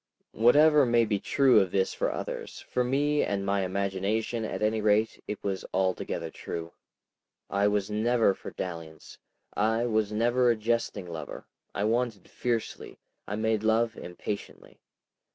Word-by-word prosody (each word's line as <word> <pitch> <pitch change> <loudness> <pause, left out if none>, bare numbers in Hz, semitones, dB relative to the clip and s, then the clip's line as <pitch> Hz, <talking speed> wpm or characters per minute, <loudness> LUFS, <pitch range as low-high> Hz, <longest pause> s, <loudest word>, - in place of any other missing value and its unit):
Whatever 145 +6 +5
may 120 -2 +3
be 105 -2 0
true 135 -1 +4
of 95 -2 +1
this 95 +1 0
for - - -1
others, - - -6
for 125 - -1
me 145 +4 +1
and 100 -1 -2
my 100 0 +1
imagination, 100 +4 -1
at 110 - -3
any 110 +1 +1
rate, 105 +1 +1
it 105 - -3
was 95 -2 -2
altogether 95 -1 -1
true. 85 0 -6 0.8
I 100 +1 +2
was 105 0 0
never 110 0 +3
for - - -9
dalliance, 85 -3 -7 0.4
I 110 +3 +1
was 110 -3 0
never 120 +3 +2
a 120 - +4
jesting 110 -3 -1
lover. 85 -2 -7 0.3
I 100 - -1
wanted 115 -1 -1
fiercely; 120 -2 -3 0.3
I 105 - -3
made 110 0 0
love 110 +1 +2
impatiently. 95 +4 -7
110 Hz, 150 wpm, -28 LUFS, 100-120 Hz, 0.8 s, Whatever